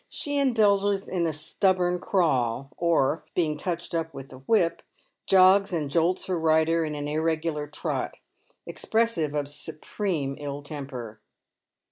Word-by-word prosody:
She 290 -1 -2
indulges 205 -6 +2
in 175 -2 0
a - - 0
stubborn 180 +3 +1
crawl, 135 - 0
or, 165 -3 +1
being 155 -4 +1
touched 170 +2 -4
up 165 -1 -2
with 135 0 -8
the 130 - -12
whip, 170 +4 +1 0.5
jogs 195 +1 +6
and 150 -4 -2
jolts 170 +3 +1
her 180 -3 -1
rider 160 +1 +3
in 155 -1 -3
an 145 0 -4
irregular 155 0 -1
trot, 150 - -3 0.5
expressive 220 -10 0
of 145 -1 -1
supreme 150 0 -3
ill 145 0 -5
temper. 130 -7 -7
165 Hz, 135 wpm, -26 LUFS, 145-185 Hz, 0.5 s, jogs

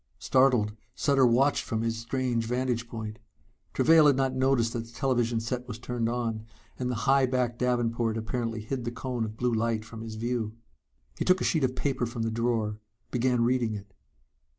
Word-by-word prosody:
Startled, 125 -6 +3 0.2
Sutter 135 -3 +3
watched 135 +5 +3
from 110 -1 -2
his 115 0 0
strange 120 -1 -1
vantage 125 -1 -1
point. 110 -2 -6 0.5
Travail 160 -2 +6
had 140 - +5
not 135 -1 +1
noticed 130 -3 +2
that 115 -1 -4
the - - -15
television 120 -2 0
set 125 +2 -4
was 120 -3 -6
turned 120 -1 -2
on, 115 -2 -2 0.3
and 125 -1 -1
the 125 - -1
high 135 -1 +4
backed 125 -2 -1
davenport 120 -2 0
apparently 115 0 -3
hid 125 +3 -4
the 120 - -2
cone 125 0 -3
of 110 0 -5
blue 125 0 0
light 110 -1 0
from 110 0 -9
his 110 -1 -6
view. 115 -1 -2 0.7
He - - +1
took 185 0 +4
a - - -2
sheet 160 -4 +1
of 130 0 +1
paper 130 -2 -1
from 115 0 -4
the 115 - -1
drawer, 110 -2 -1 0.3
began 125 -1 +2
reading 120 -2 +1
it. 100 -1 -10
120 Hz, 190 wpm, -28 LUFS, 115-130 Hz, 0.7 s, Travail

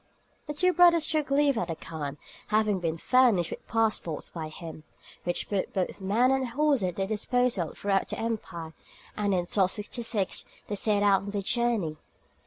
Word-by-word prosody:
The 295 - -4
two 365 +4 +3
brothers 345 -2 +6
took 310 -3 0
leave 280 -3 +3
of 175 - -2
the 165 - -3
khan, 150 -3 -6 0.3
having 210 -2 +2
been 165 -2 -2
furnished 225 -5 +3
with - - -8
passports 220 -8 -1
by 160 -2 -6
him, 155 -1 -9 0.4
which 175 - -1
put 200 -2 -2
both 190 +1 -2
men 225 +7 +3
and 265 -1 +1
horses 285 +1 +2
at 180 - -4
their 195 - -1
disposal 215 -3 0
throughout 195 -1 0
the - - -5
empire, 180 -8 -4 0.4
and 210 - -1
in 190 -3 +2
1266 205 +2 -1 0.2
they - - -4
set 205 0 +2
out 200 -2 +4
on 200 - -6
their 200 -1 -3
journey. 225 -9 +1
205 Hz, 175 wpm, -28 LUFS, 180-245 Hz, 0.4 s, brothers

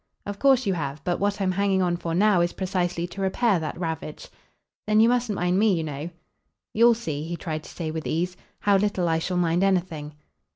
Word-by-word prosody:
"Of 205 0 -5
course 265 -3 +4
you 195 - +1
have. 150 -3 -4
But 175 -1 -1
what 205 +1 0
I'm 190 -2 +1
hanging 195 0 +1
on 175 -1 +1
for 165 -1 -3
now 200 -1 +4
is 175 0 0
precisely 180 -2 -1
to 185 +3 -7
repair 195 +1 +2
that 160 +1 -5
ravage." 160 -3 -5 0.6
"Then 215 0 +4
you 225 - +6
mustn't 245 -3 +1
mind 180 +1 +1
me, 210 -3 +4
you 165 - -2
know." 150 +1 -5 0.6
"You'll 235 +2 +5
see," 155 -11 -4
he 165 +3 -4
tried 155 -1 -4
to - - -10
say 160 -3 -5
with 160 0 -4
ease, 180 +3 -1 0.3
"how 200 -1 +4
little 195 -3 0
I 160 -1 +1
shall 180 +2 -2
mind 175 +1 +2
anything." 170 -6 -1
180 Hz, 215 wpm, -25 LUFS, 165-200 Hz, 0.6 s, you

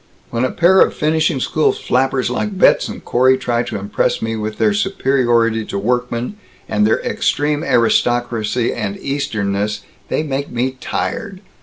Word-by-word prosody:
When 120 +1 -1
a - - 0
pair 185 +3 +4
of - - +3
finishing 155 -2 +1
school 155 +4 +1
flappers 130 -1 0
like 200 +10 -2
Betz - - +4
and - - -9
Corey 130 +2 +3
try 120 -2 0
to 120 - -4
impress 100 +1 -1
me 115 0 -2
with 110 -1 -4
their 210 - +2
superiority 120 - +1
to 100 - -4
workmen, 125 - -2 0.3
and 105 0 +2
their 110 - +1
extreme 150 +1 0
aristocracy 120 -2 +1
and 100 -3 -4
Easternness, 105 -6 -2 0.3
they - - -1
make 140 -1 -3
me 125 +2 -1
tired. 200 -5 -4
125 Hz, 155 wpm, -18 LUFS, 115-145 Hz, 0.3 s, pair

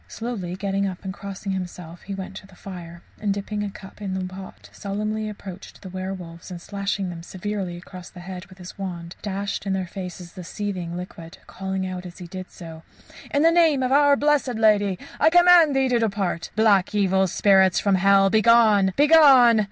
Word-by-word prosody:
Slowly 215 -7 -5
getting 195 0 -1
up 185 0 -7
and 190 - -4
crossing 200 0 -6
himself, 180 -2 -6
he 195 - -6
went 195 0 -7
to 195 - -12
the 190 - -18
fire, 170 -2 -10 0.2
and 210 -1 -1
dipping 205 +1 -3
a 205 - -3
cup 195 +1 -13
in 195 -2 -3
the 190 -1 -3
pot, 190 +1 -10
solemnly 215 +2 -3
approached 195 -2 -10
the 190 - -8
werwolves, 185 -2 -7
and 180 -2 -7
slashing 200 0 -3
them 170 -1 -8
severely 185 0 -5
across 180 0 -11
the 180 - -12
head 185 +1 -8
with 185 -1 -16
his 180 +1 -11
wand, 175 -3 -6
dashed 200 0 -4
in 195 - 0
their 190 -1 -1
faces 180 -1 -8
the 185 - -9
seething 180 -2 -5
liquid, 170 -2 -9
calling 190 0 -4
out 185 -1 -6
as 175 - -12
he 180 - -9
did 185 +1 -8
so: 165 -2 -11 0.5
"In 285 - +2
the 330 - +6
name 325 -6 +3
of 255 - -1
Our 285 0 +5
Blessed 285 -3 +1
Lady 205 -3 +3 0.2
I - - +5
command 350 -3 +6
thee 270 0 +2
to 245 -1 +2
depart. 195 -6 -2
Black, 210 -3 +3
evil 190 -1 +2
devils 190 -1 +4
from 200 - +1
hell, 195 +1 +4
begone! 215 -3 +4
Begone! 280 -7 +6
195 Hz, 195 wpm, -23 LUFS, 185-215 Hz, 0.5 s, the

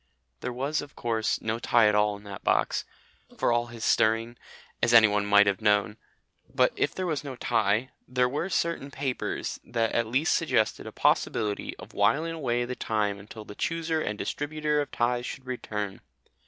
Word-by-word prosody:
There 125 - -4
was, 140 +5 -1
of 145 0 -11
course, 115 -2 -1
no 110 +1 -1
tie 120 -2 +4
at 105 - +3
all 105 0 +2
in 100 - -16
that 100 -2 -9
box, - - +1 0.5
for - - +2
all 120 0 +1
his 115 -1 -6
stirring 115 +2 +2 0.5
as 120 - +4
anyone 105 -2 +6
might 105 0 +6
have 100 +1 0
known; 105 0 +2 0.5
but, - - +3
if - - 0
there 185 - -2
was 155 -5 -2
no 140 -3 -6
tie, 115 0 +1 0.2
there 125 0 +2
were 145 +8 -2
certain 170 -6 -1
papers 135 -2 -3
that 115 -1 -1
at 115 -1 +1
least 135 +8 +2
suggested 110 -9 +1
a - - -6
possibility 105 -2 0
of - - -12
whiling 145 +11 +2
away 120 -6 -1
the 125 +1 -4
time 105 -4 -1
until 105 +2 -10
the 105 - -9
Chooser 165 +5 -1
and 105 -6 -3
Distributer 150 +3 -1
of 145 - -4
Ties 120 0 0
should 135 - -7
return. 105 -6 -4
120 Hz, 180 wpm, -27 LUFS, 105-140 Hz, 0.5 s, anyone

